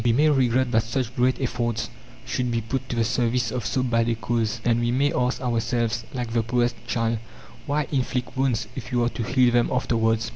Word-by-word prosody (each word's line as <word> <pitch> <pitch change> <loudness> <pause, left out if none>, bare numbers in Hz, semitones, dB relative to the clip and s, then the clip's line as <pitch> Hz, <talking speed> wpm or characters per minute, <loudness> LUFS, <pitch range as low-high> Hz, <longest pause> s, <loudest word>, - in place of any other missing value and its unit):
We 120 -1 +3
may 150 +5 +4
regret 130 -2 +2
that 110 - +4
such 120 +2 -3
great 125 +1 +2
efforts 120 -3 -2 0.3
should 125 0 -1
be 115 -1 0
put 115 +4 -4
to - - -2
the 115 - +2
service 120 0 +1
of 120 -2 -2
so 130 - 0
bad 115 -2 +1
a 115 - +1
cause, 115 0 -1
and 120 -1 +3
we 120 0 +1
may 140 +4 +2
ask 125 +1 0
ourselves 115 -1 -1
like 120 -3 -4
the 115 - +3
poet's 120 +1 +1
child: 115 0 0 0.5
"Why 145 +1 +1
inflict 125 -2 -1
wounds 130 -5 +1
if 125 -1 -7
you 120 -1 +2
are 120 - +2
to 120 - -5
heal 125 +2 +3
them 120 -1 +3
afterwards?" 115 -3 +1
120 Hz, 215 wpm, -24 LUFS, 115-125 Hz, 0.5 s, may